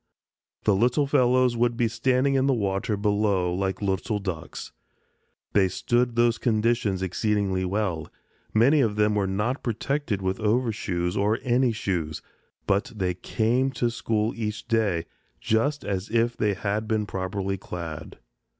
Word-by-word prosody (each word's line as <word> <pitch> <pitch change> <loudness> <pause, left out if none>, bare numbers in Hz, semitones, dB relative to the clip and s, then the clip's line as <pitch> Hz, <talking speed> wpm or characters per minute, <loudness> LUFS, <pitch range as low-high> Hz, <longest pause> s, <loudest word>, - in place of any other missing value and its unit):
The 105 - +3
little 125 +8 +2
fellows 130 -3 +3
would 120 0 +1
be 120 -2 +2
standing 130 +4 +1
in 135 0 +2
the 135 - +3
water 100 0 -1
below 100 -3 +1
like 95 +2 -2
little 100 +2 0
ducks. 90 -5 -6 0.8
They 100 -2 +4
stood 120 +6 0
these 120 -1 +3
conditions 110 -4 +1
exceedingly 95 0 0
well. 90 -5 -1 0.4
Many 135 +7 +4
of 110 -5 +1
them 105 0 +2
were 100 -2 +1
not 105 +8 -1
protected 120 -1 -2
with 95 +2 -1
overshoes 105 -6 0
or 105 +2 +2
any 125 0 +2
shoes, 85 -8 -3 0.4
but 100 0 +1
they 95 -3 0
came 115 +8 0
to 120 -1 0
school 115 -1 -1
each 105 -1 -4
day 105 -8 +1 0.3
just 120 +6 0
as 95 -1 -3
if 115 +1 +1
they 105 -2 0
had 105 +3 -2
been 110 -1 0
properly 95 0 -3
clad. 80 -4 -7
105 Hz, 145 wpm, -25 LUFS, 95-120 Hz, 0.8 s, They